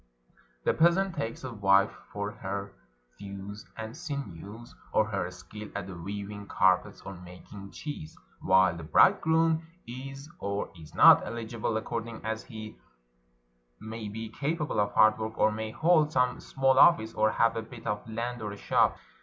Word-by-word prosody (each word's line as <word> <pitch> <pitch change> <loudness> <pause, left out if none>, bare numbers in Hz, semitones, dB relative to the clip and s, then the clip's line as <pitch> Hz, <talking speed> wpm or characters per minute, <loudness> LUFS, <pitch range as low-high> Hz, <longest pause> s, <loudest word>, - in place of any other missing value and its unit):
The - - +2
peasant 175 +3 +3
takes 125 -8 -4
a 130 -2 -5
wife 100 -1 +4 0.2
for 100 0 -3
her 100 -2 -5 0.5
thews 100 +1 -8
and 110 +1 -6
sinews, 115 - -7 0.2
or 110 - +3
her 100 -4 -2
skill 105 +3 -10
at 100 -2 -4
weaving 100 +3 -6
carpets 95 -1 +2
or 100 - -8
making 90 +2 -11
cheese; 120 - -8 0.2
while 95 -1 +4
the 85 - -7
bridegroom 160 - +4 0.2
is 135 +3 -8
or 100 0 -3
is 80 -3 -13
not - - +8
eligible 115 -1 -3
according 115 0 -5
as 110 0 -3
he 110 -1 -9 1.0
may 110 -1 -6
be 110 +1 -6
capable 150 +3 -2
of 105 0 +1
hard 110 0 +5
work, 110 0 -4
or 110 - +4
may 110 +1 -4
hold 155 +4 +3
some 125 -3 +1
small 135 0 +2
office, 115 -11 +6
or 110 0 +3
have 115 0 +3
a 115 - -2
bit 115 +1 -12
of 105 0 -3
land 120 +2 -4
or 105 -1 -4
a - - -9
shop. - - +2
110 Hz, 160 wpm, -29 LUFS, 100-125 Hz, 1.0 s, not